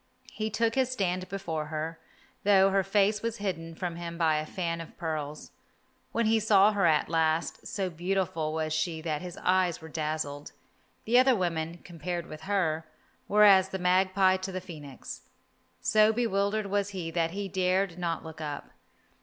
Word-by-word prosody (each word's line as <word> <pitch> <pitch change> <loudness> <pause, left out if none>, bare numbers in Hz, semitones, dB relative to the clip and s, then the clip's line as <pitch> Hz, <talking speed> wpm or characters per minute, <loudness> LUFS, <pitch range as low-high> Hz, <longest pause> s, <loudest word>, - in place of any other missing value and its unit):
He 215 0 -2
took 225 +1 +1
his 260 0 +2
stand 185 -6 -1
before 165 -6 -3
her, 160 +1 -4 0.4
though 195 -1 +5
her 195 0 +3
face 205 +2 +2
was 230 0 -2
hidden 165 -5 -4
from 170 0 -4
him 170 -1 -6
by 160 -2 +3
a 155 0 -3
fan 165 -1 -3
of 165 - -12
pearls. 155 -2 -4 0.6
When 235 - +1
he 220 +1 +4
saw 210 -1 +5
her 200 -4 +2
at 155 -2 +3
last, 160 0 0
so 195 -2 -2
beautiful 170 -2 -1
was 155 0 -2
she 160 +1 -1
that 155 -2 -2
his 180 -1 -7
eyes 185 -2 +2
were 160 - -10
dazzled. 150 -2 -3 0.5
The 240 +3 +5
other 260 0 +5
women, 170 -3 -2
compared 175 0 -5
with 155 -2 -9
her, 160 -5 0 0.4
were 210 +1 +5
as 190 -2 +7
the 190 - -3
magpie 185 +1 +3
to 190 +1 -5
the 185 - -3
phoenix. 150 -8 -9 0.6
So 215 0 +5
bewildered 215 -2 0
was 200 0 0
he 180 -5 -5
that 165 -1 +1
he 200 +3 -4
dared 185 -1 0
not 170 -2 -2
look 160 -1 -9
up. 145 -2 -5
180 Hz, 175 wpm, -29 LUFS, 160-195 Hz, 0.6 s, as